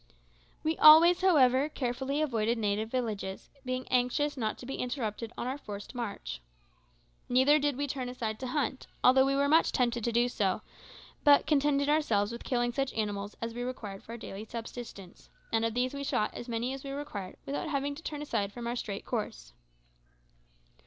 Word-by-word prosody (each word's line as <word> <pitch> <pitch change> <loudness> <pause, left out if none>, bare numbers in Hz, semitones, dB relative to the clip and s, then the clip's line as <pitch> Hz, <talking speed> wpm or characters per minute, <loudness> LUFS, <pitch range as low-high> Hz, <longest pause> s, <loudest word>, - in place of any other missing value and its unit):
We 315 +1 0
always, 330 +4 +9
however, 280 -6 +4
carefully 265 +2 -1
avoided 230 -4 0
native 215 0 -1
villages, 215 -6 -3
being 255 0 -3
anxious 255 +4 +1
not 220 -5 -2
to - - -10
be 270 - -5
interrupted 235 -3 -3
on - - -3
our 265 +3 -3
forced 205 -3 -8
march. 230 - -5 0.9
Neither 260 +5 +5
did 290 -1 0
we 285 - 0
turn 260 -3 -4
aside 225 -4 -4
to 260 - -4
hunt, 260 -1 -2 0.2
although 265 +1 +6
we 275 - +1
were 280 0 +2
much 320 +3 +4
tempted 240 -2 0
so 235 - 0
to 240 +1 +3 0.3
do, - - -17 0.6
but 290 -1 +6
contented 285 -1 +2
ourselves 235 -9 +2
with 235 - -7
killing 240 -1 0
such 275 0 -1
animals 205 -1 -3
as 230 0 -3
we 240 - -5
required 225 -6 -5
for 230 - -10
our - - -6
daily 210 -2 -7
subsistence; 225 -4 -9 0.2
and 225 0 +2
of 230 0 -1
these 255 +2 0
we 280 0 -4
shot 215 -6 0
as 240 - -7
many 235 +3 -1
as 270 - -7
we 275 - -6
required 275 -10 -6
without 285 +2 -3
having 285 -1 -1
to 290 - -10
turn 295 -2 -5
aside 210 -8 -1
from 240 +2 -7
our 235 +1 -2
straight 205 -4 -5
course. - - -4
250 Hz, 185 wpm, -30 LUFS, 225-280 Hz, 0.9 s, always